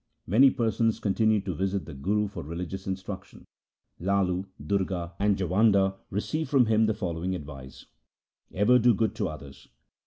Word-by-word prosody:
Many 125 +9 +6
persons 115 -2 0
continued 110 0 +1
to 95 - -2
visit 95 +3 -2
the 80 - -9
Guru 105 +10 0
for 100 - -7
religious 90 +5 -6
instruction. 95 0 -6 0.5
Lalu, 95 0 0 0.2
Durga, 95 -3 -1
and 100 -1 +2
Jawanda 95 +1 +3 0.2
received 155 +9 -2
from 130 -3 +4
him 110 0 +3
the 110 - 0
following 90 0 -3
advice, 70 -5 -10 0.3
' - - -67 0.3
Ever 120 +6 +4
do 120 -1 +4
good 110 0 0
to 105 - 0
others. 70 -4 -10
95 Hz, 155 wpm, -27 LUFS, 90-110 Hz, 0.5 s, Many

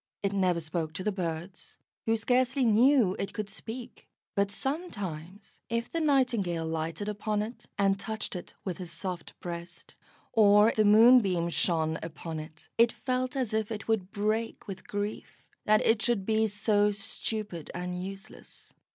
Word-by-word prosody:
It 200 0 0
never 185 -3 +2
spoke 160 0 -3
to 185 - -4
the 210 - +1
birds, 175 -1 -5 0.3
who 225 0 +3
scarcely 250 +3 +2
knew 230 -2 +5
it 195 - -3
could 210 -1 -4
speak; 235 +2 -8 0.2
but 200 -1 +1
sometimes, 200 - -5
if 230 0 -2
the 335 - -1
Nightingale 245 - +2
lighted 160 +5 -3
upon 210 0 -1
it, 230 +3 -8
and 195 -1 +2
touched 220 -1 -4
it 180 - -7
with 185 -2 -3
his 180 -3 -6
soft 175 0 -5
breast, 170 0 -7 0.4
or 210 0 +6
the 215 - +4
Moonbeam 205 -6 +6
shone 160 -2 +1
upon 160 0 -6
it, 155 0 -11
it 230 0 +6
felt 255 +1 -2
as 255 -5 -1
if 220 0 0
it 220 -1 -5
would 215 -5 0
break 215 +2 -2
with 190 -2 -8
grief 205 +1 -5 0.2
that 215 0 +4
it 225 -1 +4
should 210 -3 +1
be 220 +1 +2
so 205 0 +2
stupid 205 -3 -3
and 180 0 -3
useless. 195 0 -8
205 Hz, 160 wpm, -29 LUFS, 180-225 Hz, 0.4 s, or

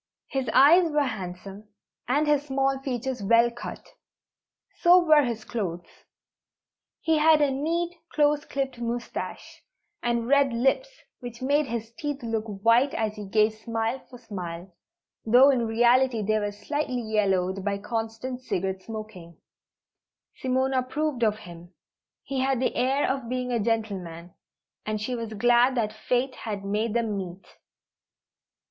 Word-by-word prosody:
His 270 -1 -2
eyes 330 +6 +6
were 295 -1 +2
handsome, 195 -3 -6 0.4
and 285 +5 +2
his 295 -1 +1
small 270 0 0
features 260 -2 -3
well 230 +4 +4
cut; 240 - -8 0.9
so 350 +1 +7
were 310 -2 +6
his 235 -5 -3
clothes. 175 -7 -4 1.2
He 320 -1 +2
had 315 0 +5
a 290 -2 +3
neat, 335 +5 -1 0.2
close 295 -1 +2
clipped 270 -4 -4
moustache, 235 0 -5 0.4
and 235 -1 -1
red 280 -1 +3
lips 270 - +1 0.3
which 245 0 -8
made 285 +2 +2
his 230 -1 -5
teeth 290 0 -5
look 225 -1 -2 0.2
white 240 +5 +4
as 215 -1 -1
he 210 -1 -7
gave 215 +2 +3
smile 225 +3 -3
for 250 - -11
smile, 180 -6 -7 0.5
though 250 +5 +6
in 240 -4 0
reality 240 +1 +3
they 215 +1 +1
were 205 -1 -2
slightly 255 +3 -3
yellowed 195 -3 0
by 200 0 -1
constant 225 +4 -4
cigarette 190 -5 -2
smoking. 215 -6 -9 1.0
Simone 260 +1 0
approved 260 +1 -1
of 215 -1 +2
him. 175 +1 -12 0.5
He 270 -1 -3
had 265 -1 +1
the 255 - 0
air 265 +3 +1
of 265 -3 -2
being 250 0 -2
a 235 - +1
gentleman, 195 -7 -3 0.5
and 215 0 -3
she 220 +4 -3
was 230 -2 -4
glad 240 +4 +4
that 215 -3 -1
fate 250 +4 -1
had 205 -3 -5
made 210 +3 -1
them 225 -3 0
meet. 185 -1 -6
235 Hz, 145 wpm, -26 LUFS, 215-265 Hz, 1.2 s, so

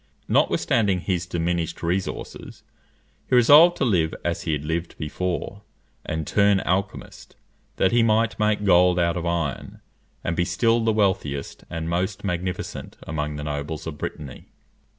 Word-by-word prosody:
Notwithstanding 100 -6 +2
his 90 -2 -2
diminished 85 -1 -2
resources, 90 +3 -4 0.7
he - - +3
resolved 150 +8 +7
to - - +1
live 85 -8 +1
as 85 -1 -1
he 80 - -2
had 75 0 -3
lived 80 +2 -3
before, 90 +5 -4 0.4
and 80 -1 -3
turn 100 +2 +3
alchymist, 95 +2 -3 0.4
that 95 - +2
he 120 - +4
might 115 0 +2
make 105 -1 +1
gold 90 -1 +5
out 85 -1 +1
of 85 -1 -3
iron, 85 -5 -3 0.4
and 85 - -1
be 90 - +1
still 115 +5 +1
the 110 - +2
wealthiest 95 -10 -1
and 80 0 -4
most 90 +4 -2
magnificent 90 -1 -4
among 75 -2 -3
the 75 - -5
nobles 75 +1 -4
of 75 -3 -6
Brittany. 70 -4 -7
90 Hz, 150 wpm, -24 LUFS, 80-100 Hz, 0.7 s, resolved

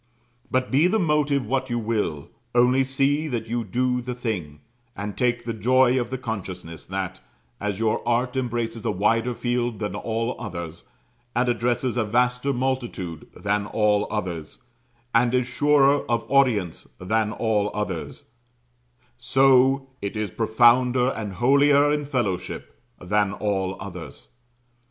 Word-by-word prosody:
But 130 0 0
be 145 +6 +4
the 210 +4 +2
motive 150 - +1
what 130 +4 -1
you 120 - -1
will, 105 -10 -2 0.3
only 125 +2 +4
see 140 +3 +1
that 120 -6 -3
you 120 +1 -2
do 125 +4 0
the 125 0 -5
thing; 90 - -4 0.3
and 100 0 -5
take 120 -2 0
the 115 - -2
joy 130 +3 +3
of 120 - -5
the 130 - -3
consciousness 95 -8 -6
that, 95 0 -4 0.4
as 105 -2 -2
your 110 0 0
art 125 +2 +1
embraces 120 -3 -2
a - - 0
wider 115 +5 +1
field 120 -2 -1
than 105 -3 -3
all 115 +3 -2
others 85 -7 -6 0.5
and 125 +1 +2
addresses 120 +1 0
a 120 - +2
vaster 125 +4 +1
multitude 120 - -3
than 105 0 -1
all 105 -1 +2
others 85 -7 -5 0.5
and 120 +1 +3
is 125 -1 +2
surer 145 +2 +3
of 115 -1 0
audience 120 -11 +2
than 110 +3 0
all 110 -3 0
others 105 0 -5 0.9
so 135 +1 +4
it 100 +1 -4
is 105 -3 -2
profounder 120 +3 +4
and 105 -6 -4
holier 140 +6 +4
in 150 -1 -1
Fellowship 110 - -3 0.3
than 100 +2 0
all 95 -2 -2
others. 90 -9 -9
120 Hz, 140 wpm, -24 LUFS, 105-130 Hz, 0.9 s, be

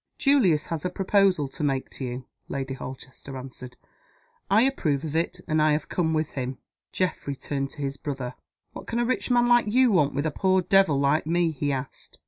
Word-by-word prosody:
"Julius 275 - +3
has 165 -3 -4
a 180 - 0
proposal 190 -4 +2
to 135 - -6
make 135 -2 -1
to - - -7
you," 125 0 -5 0.2
Lady 135 -1 -3
Holchester 130 +1 -8
answered. 125 -1 -9 0.7
"I 210 +4 +5
approve 160 - 0
of 155 0 -4
it; 165 +1 -1
and 155 0 +2
I 155 0 +4
have 150 0 -2
come 165 -3 0
with 155 -1 -1
him." 130 -1 -4 0.3
Geoffrey 165 -6 -2
turned 135 0 -3
to 145 - -7
his 135 0 -3
brother. 135 -4 -4 0.4
"What - - -9
can 230 - -2
a 240 - +2
rich 255 +2 -1
man 240 -1 +4
like 240 -2 +4
you 250 +3 +4
want 150 -9 +2
with 140 +2 -1
a 155 - 0
poor 190 +4 +2
devil 190 -7 +4
like 140 +3 +2
me?" 170 0 +2
he 145 -1 -2
asked. 135 0 -5
155 Hz, 205 wpm, -26 LUFS, 135-190 Hz, 0.7 s, I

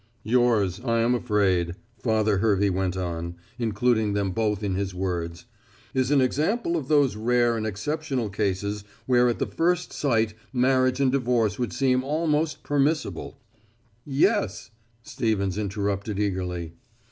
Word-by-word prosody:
"Yours, 110 -6 +2
I 115 -2 +1
am 120 +2 +3
afraid," 95 -7 +1 0.2
Father 110 -2 +1
Hervey 100 -2 +2
went 95 0 -1
on, 85 -1 -4 0.2
including 110 -1 +1
them 100 -2 0
both 105 0 -1
in 100 -2 0
his 95 -1 -2
words, 85 -3 -3 0.5
"is 130 -1 +1
an 145 -1 +4
example 170 - 0
of 150 -6 -2
those 145 -6 +3
rare 120 +2 +2
and 110 -1 -2
exceptional 135 +3 -2
cases 100 0 -2 0.2
where 125 -1 +4
at 120 - -1
the - - 0
first 175 +1 0
sight 115 -6 +1 0.2
marriage 130 0 +2
and 135 -2 +3
divorce 120 -5 +1
would 120 -6 -1
seem 130 +5 +1
almost 155 +1 0
permissible 145 +2 -1 0.4
" 110 +3 -38 0.2
"Yes," 110 - -2 0.3
Stevens 100 -5 -1
interrupted 100 0 -2
eagerly. 90 -5 -2
110 Hz, 140 wpm, -25 LUFS, 100-130 Hz, 0.5 s, an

